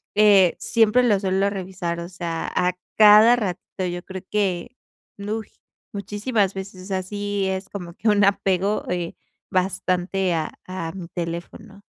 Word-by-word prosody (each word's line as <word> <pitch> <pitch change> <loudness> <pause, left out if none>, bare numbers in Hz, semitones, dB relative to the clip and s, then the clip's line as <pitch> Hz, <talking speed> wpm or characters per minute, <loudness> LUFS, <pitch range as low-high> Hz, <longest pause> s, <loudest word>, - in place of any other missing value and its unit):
Eh, 200 -4 +6
siempre 230 +2 +3
lo 210 -5 +3
suelo 195 +1 +1
revisar, 185 -3 -4
o 170 - -5
sea, 170 -2 -4
a 180 0 +2 0.2
cada 215 +2 +8
ratito 190 -3 -4
yo 175 0 -5
creo 190 -1 -7
que, 200 +2 -1 0.4
¡uy!, 210 +2 -5 0.4
muchísimas 205 0 -1
veces, 190 -1 -8
o - - -11
sea, 190 -1 -2
sí 205 0 -2
es 190 0 -3
como 175 -4 -8
que 225 - -4
un 205 -1 +4
apego, 195 +1 +1
eh, 175 -2 -3 0.4
bastante 185 0 0
a 155 -1 -2 0.2
a 185 -3 -4
mi 185 -3 -7
teléfono. 175 +5 -6
190 Hz, 150 wpm, -23 LUFS, 180-205 Hz, 0.4 s, cada